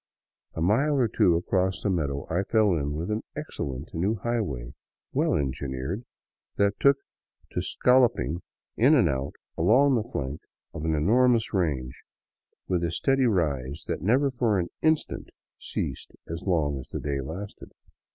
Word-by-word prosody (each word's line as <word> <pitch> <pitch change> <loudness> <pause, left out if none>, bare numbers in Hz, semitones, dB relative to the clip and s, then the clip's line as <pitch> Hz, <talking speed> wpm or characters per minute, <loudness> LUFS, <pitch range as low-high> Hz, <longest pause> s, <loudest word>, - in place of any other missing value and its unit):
A 80 - -3
mile 135 - +3
or 130 -4 +3
two 105 -5 +3
across 95 +2 0
the 105 - +1
meadow 70 -6 -1
I 85 +4 0
fell 105 -1 +3
in 75 -2 -1
with 85 +6 -3
an 105 +1 -1
excellent 70 +2 -5
new 95 +7 0
highway, 100 - -3 0.4
well - - +2
engineered, 70 - -3 0.5
that 100 0 +1
took 140 0 +5 0.5
to - - -1
scolloping 120 - +2 0.3
in 135 +7 +5
and 120 - +5
out 65 -1 -2 0.2
along 135 +5 +5
the 115 -1 0
flank 70 +2 -4 0.3
of 75 - -5
an 80 -1 +1
enormous 115 +8 +3
range, 70 -10 -1 0.7
with 90 -2 0
a 85 - +1
steady 135 +8 +2
rise 75 - -1
that - - -3
never 130 +8 +3
for 120 -5 +1
an 85 -2 -1
instant 155 -1 0 0.3
ceased - - -4
as 80 +1 -5
long 80 -7 0
as 65 - -9
the - - -4
day 70 -2 -2
lasted. 90 +9 -7
90 Hz, 155 wpm, -27 LUFS, 75-115 Hz, 0.7 s, took